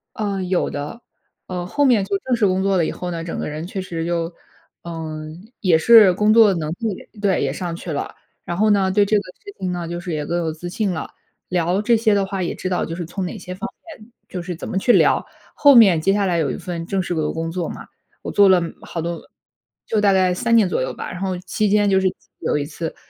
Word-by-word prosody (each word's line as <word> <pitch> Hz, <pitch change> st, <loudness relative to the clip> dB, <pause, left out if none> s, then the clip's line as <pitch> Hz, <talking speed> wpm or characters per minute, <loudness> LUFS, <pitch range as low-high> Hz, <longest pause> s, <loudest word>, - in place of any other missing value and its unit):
呃， 200 Hz, -3 st, -2 dB
有 180 Hz, 0 st, 0 dB
的。 145 Hz, +11 st, -6 dB, 0.5 s
呃， 180 Hz, -1 st, -4 dB
后 290 Hz, +11 st, 0 dB
面 235 Hz, -8 st, +4 dB
就 200 Hz, -, -1 dB
正 255 Hz, +2 st, 0 dB
式 225 Hz, -, +2 dB
工 185 Hz, 0 st, +1 dB
作 195 Hz, -1 st, +2 dB
了 170 Hz, -, +2 dB
以 -, -, -2 dB
后 180 Hz, -, -5 dB
呢， 165 Hz, -1 st, -4 dB
整 170 Hz, -, -5 dB
个 -, -, -3 dB
人 155 Hz, +2 st, -5 dB
确 190 Hz, +1 st, -5 dB
实 165 Hz, -3 st, -4 dB
就 170 Hz, 0 st, -1 dB, 0.5 s
嗯， 160 Hz, +3 st, -7 dB
也 180 Hz, -5 st, +4 dB
是 215 Hz, -1 st, +7 dB
工 210 Hz, +3 st, +2 dB
作 220 Hz, -3 st, +6 dB
能 160 Hz, -4 st, -3 dB
力 220 Hz, -5 st, -4 dB
对， 195 Hz, -3 st, +2 dB
也 -, -, 0 dB
上 175 Hz, -2 st, -4 dB
去 170 Hz, 0 st, -7 dB
了。 145 Hz, -, -4 dB, 0.3 s
然 175 Hz, -, -3 dB
后 215 Hz, +3 st, +2 dB
呢， 195 Hz, -2 st, +3 dB
对 205 Hz, +2 st, +4 dB
这 210 Hz, +1 st, +2 dB
个 -, -, +1 dB, 0.2 s
事 405 Hz, -1 st, -11 dB
情 185 Hz, -1 st, -2 dB
呢， 175 Hz, -2 st, -4 dB
就 175 Hz, +1 st, -4 dB
是 175 Hz, -1 st, -5 dB
也 150 Hz, -1 st, -2 dB
更 170 Hz, -, -1 dB
有 165 Hz, -2 st, -1 dB
自 175 Hz, +3 st, -7 dB
信 200 Hz, +2 st, -1 dB
了， 160 Hz, -, -4 dB, 0.4 s
聊 180 Hz, +2 st, 0 dB
这 230 Hz, +2 st, +3 dB
些 220 Hz, -1 st, +2 dB
的 200 Hz, -1 st, +2 dB
话， 195 Hz, -1 st, -3 dB
也 -, -, -2 dB
知 185 Hz, -, -4 dB
道 180 Hz, -, 0 dB
就 165 Hz, -, -5 dB
是 175 Hz, -, -4 dB
从 185 Hz, +3 st, -4 dB
哪 180 Hz, -, -5 dB
些 180 Hz, 0 st, -7 dB
方 230 Hz, +5 st, -5 dB, 0.3 s
面 220 Hz, +2 st, -17 dB, 0.2 s
就 180 Hz, -2 st, -6 dB
是 175 Hz, -1 st, -5 dB
怎 -, -, -7 dB
么 -, -, -2 dB
去 240 Hz, +5 st, +3 dB
聊。 -, -, +4 dB, 0.3 s
后 285 Hz, -1 st, +6 dB
面 200 Hz, -9 st, +7 dB
接 195 Hz, +5 st, +2 dB
下 200 Hz, 0 st, +1 dB
来 175 Hz, -2 st, +1 dB
有 145 Hz, -5 st, 0 dB
一 -, -, -4 dB
份 170 Hz, -3 st, -5 dB
正 195 Hz, +1 st, -1 dB
式 175 Hz, -1 st, -3 dB
的 155 Hz, -2 st, -1 dB
工 165 Hz, 0 st, -3 dB
作 175 Hz, -1 st, -3 dB
嘛， -, -, -8 dB, 0.3 s
我 -, -, -5 dB
做 200 Hz, -1 st, +5 dB
了 185 Hz, -2 st, +5 dB, 0.2 s
好 165 Hz, -, -5 dB
多 170 Hz, +1 st, -3 dB, 0.7 s
就 220 Hz, -, +1 dB
大 200 Hz, -1 st, +4 dB
概 185 Hz, -1 st, +3 dB
3 230 Hz, +4 st, +1 dB
年 210 Hz, -5 st, +4 dB
左 180 Hz, -, 0 dB
右 -, -, -3 dB
吧， -, -, -6 dB
然 175 Hz, -, -7 dB
后 190 Hz, -1 st, -2 dB
期 200 Hz, +3 st, -1 dB
间 205 Hz, 0 st, +3 dB
就 190 Hz, -1 st, +4 dB
是 190 Hz, -, +2 dB, 0.3 s
有 -, -, 0 dB
一 -, -, -1 dB
次 165 Hz, +2 st, -6 dB
185 Hz, 275 characters per minute, -21 LUFS, 170-205 Hz, 0.7 s, 是